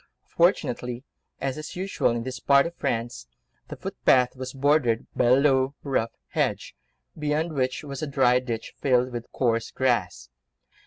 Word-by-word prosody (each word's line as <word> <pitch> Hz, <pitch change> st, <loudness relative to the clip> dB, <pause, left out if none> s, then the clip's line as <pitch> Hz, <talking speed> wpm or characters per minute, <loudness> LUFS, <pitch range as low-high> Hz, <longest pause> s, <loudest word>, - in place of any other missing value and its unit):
Fortunately—as 135 Hz, -4 st, -1 dB
is 155 Hz, -, -8 dB
usual 190 Hz, -5 st, 0 dB
in 115 Hz, 0 st, -2 dB
this 130 Hz, 0 st, -5 dB
part 140 Hz, +2 st, +4 dB
of 170 Hz, -, -4 dB
France—the 115 Hz, -, -6 dB
footpath 125 Hz, 0 st, +2 dB
was 130 Hz, 0 st, -6 dB
bordered 135 Hz, -4 st, +2 dB
by -, -, +2 dB
a 120 Hz, +2 st, +6 dB
low, 135 Hz, 0 st, +2 dB
rough 130 Hz, -5 st, -1 dB
hedge, -, -, -1 dB, 0.4 s
beyond 155 Hz, +2 st, -1 dB
which 130 Hz, -1 st, -1 dB
was 140 Hz, -2 st, -6 dB
a 155 Hz, -, -2 dB
dry 130 Hz, -3 st, +3 dB
ditch, 120 Hz, -3 st, -5 dB
filled 125 Hz, -2 st, +1 dB
with 120 Hz, -1 st, -7 dB
coarse 115 Hz, -3 st, 0 dB
grass. 100 Hz, -, -1 dB
130 Hz, 145 wpm, -25 LUFS, 120-140 Hz, 0.4 s, a